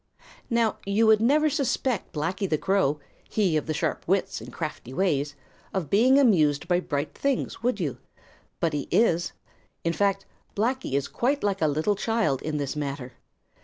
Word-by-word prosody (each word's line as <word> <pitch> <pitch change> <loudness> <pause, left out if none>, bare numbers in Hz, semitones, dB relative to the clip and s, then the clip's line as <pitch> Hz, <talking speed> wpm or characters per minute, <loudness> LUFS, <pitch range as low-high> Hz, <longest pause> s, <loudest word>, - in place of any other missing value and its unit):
Now 230 -3 +1
you 200 +3 +2
would 220 -1 +5
never 295 +6 +4
suspect 265 - -1
Blacky 180 +6 -2
the 155 - +2
Crow, 190 -5 +1 0.3
he 195 -7 +1
of 155 - -1
the 155 - 0
sharp - - -1
wits - - 0
and - - -9
crafty 130 +3 -6
ways, 145 -6 0 0.4
of 180 -6 -2
being 250 +7 +5
amused 165 - +3
by 175 0 +3
bright 145 -4 -3
things, 280 -2 -2
would 240 -2 0
you? 150 -8 -2 0.6
But 165 -2 0
he 145 -2 -2
is. 175 -6 +2 0.5
In 170 - +1
fact, 195 +1 +1 0.3
Blacky 240 - -1
is 140 0 0
quite 275 +4 0
like 200 -2 0
a 155 - +4
little 155 +8 +1
child 215 - 0
in 155 -1 -2
this 140 -1 -3
matter. 140 -3 -4
190 Hz, 170 wpm, -26 LUFS, 150-225 Hz, 0.6 s, would